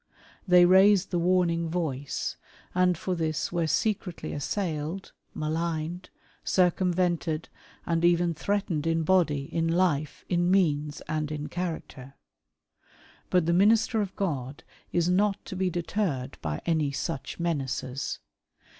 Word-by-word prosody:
They 180 Hz, -1 st, +7 dB
raised 190 Hz, +1 st, +5 dB
the 175 Hz, -, +1 dB
warning 170 Hz, -2 st, +2 dB
voice, 145 Hz, -6 st, -2 dB, 0.4 s
and 180 Hz, -1 st, +3 dB
for 185 Hz, -, -2 dB
this 160 Hz, -3 st, -1 dB
were 170 Hz, -2 st, 0 dB
secretly 185 Hz, +2 st, -1 dB
assailed, 160 Hz, +2 st, -3 dB, 0.2 s
maligned, 160 Hz, +2 st, -3 dB, 0.3 s
circumvented, 175 Hz, -3 st, +1 dB, 0.4 s
and 165 Hz, 0 st, 0 dB
even 175 Hz, 0 st, +3 dB
threatened 185 Hz, -4 st, -1 dB
in 165 Hz, 0 st, +1 dB
body, 155 Hz, -5 st, +2 dB
in 165 Hz, 0 st, +1 dB
life, 165 Hz, -4 st, 0 dB
in 175 Hz, -1 st, +1 dB
means, 150 Hz, -6 st, +1 dB
and 155 Hz, 0 st, -3 dB
in 150 Hz, -1 st, -4 dB
character. 160 Hz, -6 st, -5 dB, 1.1 s
But 180 Hz, -3 st, +3 dB
the 170 Hz, -, +2 dB
minister 220 Hz, +4 st, +4 dB
of 195 Hz, -2 st, -4 dB
God 140 Hz, -8 st, -3 dB, 0.3 s
is 170 Hz, -1 st, +1 dB
not 195 Hz, +2 st, +1 dB
to -, -, -6 dB
be 185 Hz, 0 st, 0 dB
deterred 170 Hz, -7 st, -2 dB
by 75 Hz, -1 st, -3 dB
any 155 Hz, -4 st, +1 dB
such 135 Hz, +2 st, -4 dB
menaces. 140 Hz, -5 st, -2 dB
170 Hz, 125 wpm, -27 LUFS, 155-185 Hz, 1.1 s, They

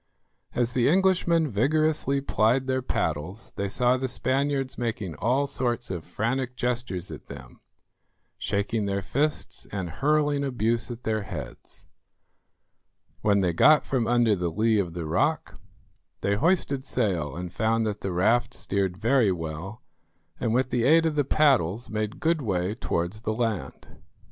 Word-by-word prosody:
As 120 Hz, 0 st, 0 dB
the 125 Hz, -1 st, +3 dB
Englishmen 175 Hz, -2 st, +3 dB
vigorously 140 Hz, +3 st, +1 dB
plied 125 Hz, 0 st, +2 dB
their 130 Hz, 0 st, 0 dB
paddles 80 Hz, -, -3 dB
they 100 Hz, 0 st, -2 dB
saw 125 Hz, +5 st, +2 dB
the 130 Hz, +1 st, -2 dB
Spaniards 135 Hz, +1 st, 0 dB
making 110 Hz, -7 st, -3 dB
all 130 Hz, +5 st, +1 dB
sorts 120 Hz, -5 st, -2 dB
of 85 Hz, -4 st, -5 dB
frantic 125 Hz, +6 st, -2 dB
gestures 120 Hz, -8 st, -2 dB
at -, -, -10 dB
them, 65 Hz, -3 st, -11 dB, 0.8 s
shaking 100 Hz, +1 st, -1 dB
their 100 Hz, 0 st, -1 dB
fists 150 Hz, +8 st, -2 dB
and 95 Hz, -4 st, -4 dB
hurling 145 Hz, -, +1 dB
abuse 120 Hz, -3 st, 0 dB
at 120 Hz, 0 st, -7 dB
their 110 Hz, -1 st, 0 dB
heads. -, -, -8 dB, 1.4 s
When 100 Hz, -2 st, +3 dB
they 90 Hz, -2 st, +1 dB
got 150 Hz, -, +5 dB
from 125 Hz, -4 st, 0 dB
under 120 Hz, -3 st, +3 dB
the 90 Hz, -2 st, -1 dB
lee 110 Hz, +5 st, +2 dB
of 90 Hz, -4 st, -2 dB
the 85 Hz, -2 st, -4 dB
rock, 80 Hz, -, 0 dB, 0.6 s
they 100 Hz, -, +1 dB
hoisted 140 Hz, -, +1 dB
sail 90 Hz, -, -1 dB
and 90 Hz, 0 st, -6 dB
found 110 Hz, +2 st, +1 dB
that 105 Hz, -1 st, -3 dB
the 95 Hz, -, -2 dB
raft 115 Hz, +7 st, +2 dB
steered 95 Hz, -2 st, -1 dB
very 115 Hz, 0 st, +3 dB
well, 85 Hz, -, -5 dB, 0.6 s
and 115 Hz, -, 0 dB
with 130 Hz, +2 st, +1 dB
the 120 Hz, -, +1 dB
aid 165 Hz, +5 st, +5 dB
of 160 Hz, -, +1 dB
the 145 Hz, -1 st, +2 dB
paddles 125 Hz, -, +2 dB
made 110 Hz, 0 st, -3 dB
good 165 Hz, -2 st, +1 dB
way 95 Hz, -4 st, -1 dB
towards 95 Hz, -2 st, -3 dB
the 110 Hz, -, -1 dB
land. 110 Hz, -3 st, -3 dB
115 Hz, 155 wpm, -26 LUFS, 100-135 Hz, 1.4 s, got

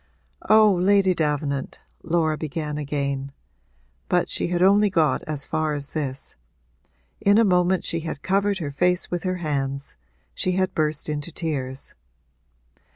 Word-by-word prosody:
'Oh, 215 Hz, -1 st, +7 dB
Lady 190 Hz, +1 st, +3 dB
Davenant,' 145 Hz, -4 st, -2 dB, 0.2 s
Laura 160 Hz, -2 st, +1 dB
began 150 Hz, -1 st, -4 dB
again, 140 Hz, -1 st, -3 dB, 0.8 s
but -, -, +2 dB
she -, -, -1 dB
only 200 Hz, +4 st, +4 dB
got 165 Hz, -5 st, +2 dB
as 150 Hz, -3 st, -1 dB
far 155 Hz, -1 st, -1 dB
as 145 Hz, -1 st, -4 dB
this; 140 Hz, -4 st, -4 dB, 0.8 s
in 200 Hz, +1 st, +4 dB
a 230 Hz, -, +6 dB
moment 180 Hz, -1 st, +2 dB
she 165 Hz, -, -2 dB
had 160 Hz, -3 st, -6 dB
covered 200 Hz, +1 st, +1 dB
her 155 Hz, -6 st, -4 dB
face 180 Hz, +5 st, +1 dB
with 175 Hz, -1 st, -1 dB
her 185 Hz, -1 st, -1 dB
hands 140 Hz, -1 st, -3 dB, 0.4 s
she 185 Hz, -, -1 dB
had 185 Hz, 0 st, 0 dB
burst 155 Hz, -1 st, -1 dB
into 150 Hz, +2 st, -4 dB
tears. 135 Hz, -5 st, -3 dB
160 Hz, 140 wpm, -24 LUFS, 145-185 Hz, 0.8 s, Oh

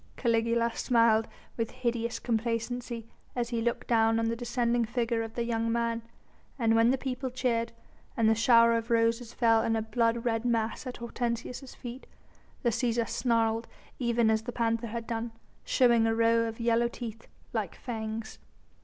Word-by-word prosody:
Caligula 230 Hz, 0 st, +1 dB
smiled 230 Hz, -2 st, +3 dB, 0.3 s
with 230 Hz, -1 st, -1 dB
hideous 235 Hz, -2 st, -2 dB
complacency 230 Hz, 0 st, -2 dB, 0.3 s
as 240 Hz, -1 st, -1 dB
he 235 Hz, -2 st, -1 dB
looked 235 Hz, +1 st, -1 dB
down 225 Hz, -1 st, +3 dB
on 225 Hz, 0 st, +1 dB
the 230 Hz, -, -1 dB
descending 240 Hz, 0 st, 0 dB
figure 230 Hz, 0 st, -1 dB
of 225 Hz, 0 st, -6 dB
the 235 Hz, -, 0 dB
young 230 Hz, -1 st, -1 dB
man, 230 Hz, 0 st, 0 dB, 0.6 s
and 225 Hz, -3 st, +2 dB
when 230 Hz, +1 st, +5 dB
the 265 Hz, -, +2 dB
people 260 Hz, 0 st, -3 dB
cheered, 240 Hz, -2 st, -1 dB, 0.5 s
and 225 Hz, -2 st, +3 dB
the 220 Hz, -, +6 dB
shower 230 Hz, +1 st, +5 dB
of 230 Hz, +1 st, -2 dB
roses 230 Hz, 0 st, +1 dB
fell 225 Hz, -2 st, +3 dB
in 225 Hz, -, +1 dB
a 220 Hz, -, 0 dB
blood 230 Hz, +1 st, 0 dB
red 225 Hz, -1 st, 0 dB
mass 230 Hz, +1 st, -1 dB
at 250 Hz, -, -6 dB
Hortensius' 240 Hz, +2 st, -4 dB
feet, 245 Hz, +2 st, -8 dB, 0.6 s
the 240 Hz, -, +3 dB
Cæsar 235 Hz, 0 st, 0 dB
snarled 230 Hz, -1 st, +1 dB, 0.3 s
even 235 Hz, -2 st, +2 dB
as 220 Hz, 0 st, +2 dB
the 235 Hz, -, -5 dB
panther 230 Hz, 0 st, 0 dB
had 230 Hz, +1 st, -5 dB
done, 230 Hz, 0 st, -3 dB, 0.3 s
showing 235 Hz, -3 st, +4 dB
a 225 Hz, -, +1 dB
row 230 Hz, 0 st, +3 dB
of 225 Hz, +1 st, -6 dB
yellow 235 Hz, 0 st, +2 dB
teeth, 230 Hz, -2 st, -8 dB, 0.3 s
like -, -, -2 dB
fangs. 220 Hz, -2 st, -5 dB
230 Hz, 170 wpm, -29 LUFS, 225-240 Hz, 0.6 s, the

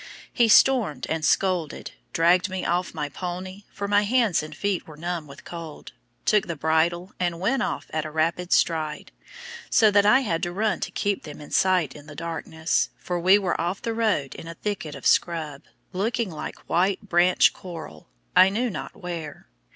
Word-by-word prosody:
He 235 Hz, -2 st, +4 dB
stormed 235 Hz, -, +4 dB
and 160 Hz, -1 st, -1 dB
scolded, 180 Hz, 0 st, 0 dB, 0.2 s
dragged 175 Hz, +3 st, +3 dB
me 185 Hz, 0 st, -4 dB
off 175 Hz, +1 st, 0 dB
the 150 Hz, -3 st, -4 dB
pony 185 Hz, +2 st, -6 dB
for 200 Hz, -1 st, -4 dB
my 205 Hz, 0 st, +4 dB
hands 225 Hz, -3 st, +2 dB
and 155 Hz, 0 st, -9 dB
feet 200 Hz, -3 st, -1 dB
were 155 Hz, -2 st, -12 dB
numb 170 Hz, -1 st, -4 dB
with 140 Hz, +1 st, -13 dB
cold 165 Hz, -3 st, -8 dB, 0.3 s
took 210 Hz, -2 st, +3 dB
the 170 Hz, -, -3 dB
bridle, 165 Hz, +5 st, +1 dB
and 175 Hz, -2 st, -1 dB
went 240 Hz, +8 st, +1 dB
off -, -, -2 dB
at 155 Hz, -1 st, 0 dB
a 155 Hz, -, -5 dB
rapid 165 Hz, +3 st, -1 dB
stride, 155 Hz, -2 st, +1 dB, 0.6 s
so 220 Hz, -3 st, +5 dB
that 205 Hz, 0 st, +5 dB
I 245 Hz, +6 st, +5 dB
had 170 Hz, -10 st, -1 dB
to 175 Hz, -, -2 dB
run 205 Hz, 0 st, 0 dB
to -, -, -3 dB
keep 200 Hz, +1 st, -1 dB
them 150 Hz, -2 st, -10 dB
in 150 Hz, -, -11 dB
sight 180 Hz, -7 st, +2 dB
in 150 Hz, 0 st, -12 dB
the 150 Hz, -, -10 dB
darkness, 160 Hz, 0 st, -1 dB
for 180 Hz, -1 st, -3 dB
we 185 Hz, +4 st, +6 dB
were 190 Hz, -5 st, -1 dB
off 175 Hz, +3 st, -2 dB
the 230 Hz, -, -1 dB
road 215 Hz, -12 st, 0 dB
in 165 Hz, -, -10 dB
a 165 Hz, -, -7 dB
thicket 185 Hz, -8 st, -4 dB
of 140 Hz, -, -10 dB
scrub, 155 Hz, -5 st, +1 dB, 0.3 s
looking 215 Hz, +2 st, -1 dB
like 155 Hz, -, -8 dB
white 190 Hz, +4 st, +1 dB
branch 175 Hz, 0 st, +4 dB
coral, 170 Hz, -4 st, -10 dB, 0.3 s
I 190 Hz, -, +8 dB
knew 230 Hz, +4 st, -1 dB
not -, -, -7 dB
where. 165 Hz, -, -7 dB
175 Hz, 190 wpm, -25 LUFS, 160-200 Hz, 0.6 s, I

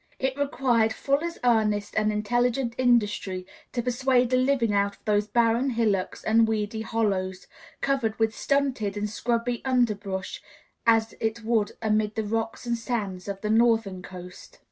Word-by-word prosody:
It 265 Hz, -1 st, -1 dB
required 250 Hz, -5 st, +1 dB
full 280 Hz, +6 st, 0 dB
as 340 Hz, 0 st, -4 dB
earnest 210 Hz, -4 st, +2 dB
and 215 Hz, 0 st, +2 dB
intelligent 240 Hz, +3 st, 0 dB
industry 205 Hz, -7 st, +1 dB, 0.3 s
to 240 Hz, -, -2 dB
persuade 250 Hz, 0 st, +2 dB
a -, -, +6 dB
living 255 Hz, -4 st, +2 dB
out 200 Hz, 0 st, +1 dB
of -, -, -33 dB
those 210 Hz, 0 st, +2 dB
barren 235 Hz, +4 st, +2 dB
hillocks 220 Hz, -6 st, 0 dB
and 225 Hz, +1 st, +4 dB
weedy 220 Hz, 0 st, -2 dB
hollows, 195 Hz, -5 st, -1 dB, 0.4 s
covered 265 Hz, -6 st, 0 dB
with 220 Hz, -1 st, +1 dB
stunted 265 Hz, -8 st, 0 dB
and 210 Hz, +1 st, -1 dB
scrubby 235 Hz, +2 st, -1 dB
underbrush, 210 Hz, -7 st, -1 dB, 0.5 s
as 225 Hz, -1 st, +4 dB
it 225 Hz, +1 st, -2 dB
would 220 Hz, -2 st, +1 dB
amid 215 Hz, -1 st, +1 dB
the 220 Hz, -, -1 dB
rocks 225 Hz, +3 st, -3 dB
and 235 Hz, -1 st, -1 dB
sands 205 Hz, -7 st, -3 dB
of 200 Hz, -1 st, -5 dB
the 210 Hz, -, -1 dB
northern 225 Hz, -4 st, +2 dB
coast. 180 Hz, 0 st, -11 dB
225 Hz, 155 wpm, -26 LUFS, 210-245 Hz, 0.5 s, a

